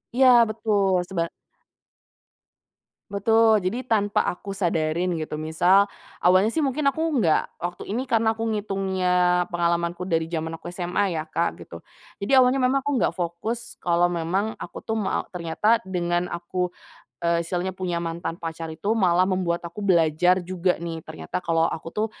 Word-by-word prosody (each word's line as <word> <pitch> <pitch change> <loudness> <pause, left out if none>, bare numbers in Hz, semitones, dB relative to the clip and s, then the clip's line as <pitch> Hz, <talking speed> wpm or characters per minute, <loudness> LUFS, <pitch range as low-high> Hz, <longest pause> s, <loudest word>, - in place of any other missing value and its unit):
Iya 265 0 +6 0.2
betul, 200 -4 +1
sebar 170 -3 -1 1.8
Betul, 220 +1 +3
jadi 240 +8 -3
tanpa 205 -2 +2
aku 195 +2 -4
sadarin 170 -2 0
gitu 155 -1 -4
misal, 175 +6 +3 0.3
awalnya, 185 +5 +4
sih, 320 - -1
mungkin 280 0 +1
aku 315 - -8 0.2
nggak 160 - +1
waktu 175 +1 -5
ini, 235 +6 -2
karena 225 -3 +1
aku 225 - -4
ngitungnya 185 -3 +1
pengalamanku 170 0 -1
dari 165 -3 0
jaman 165 -1 -4
aku - - -10
SMA, 180 +1 -1
ya, 155 - -2
Kak, 155 - -1
gitu. - - -10 0.4
Jadi 210 +7 +2
awalnya 260 +1 +5
memang 260 +1 +2
aku 290 - -1
nggak 170 - +1
fokus 225 +8 -4
kalau 175 0 +2
memang 180 +6 -1
aku, - - -8
tuh, 220 0 -2
me 200 - -1
ternyata 180 +6 +1
dengan 175 -1 -1
aku 175 +1 -3 0.5
eee, 170 0 +1
misalnya 180 +2 -3
punya 180 -2 -2
mantan 170 0 -4
pacar 165 -1 -5
itu 200 +8 -1
malah 185 -4 +3
membuat 175 -2 -1
aku 180 +5 -8
belajar 175 -1 +3
juga, 180 0 -1
nih, 165 -1 -5
ternyata 80 - -6
kalo 165 -1 +2
aku, 165 +1 -5
tuh, 215 +4 -1
180 Hz, 155 wpm, -24 LUFS, 170-205 Hz, 1.8 s, Iya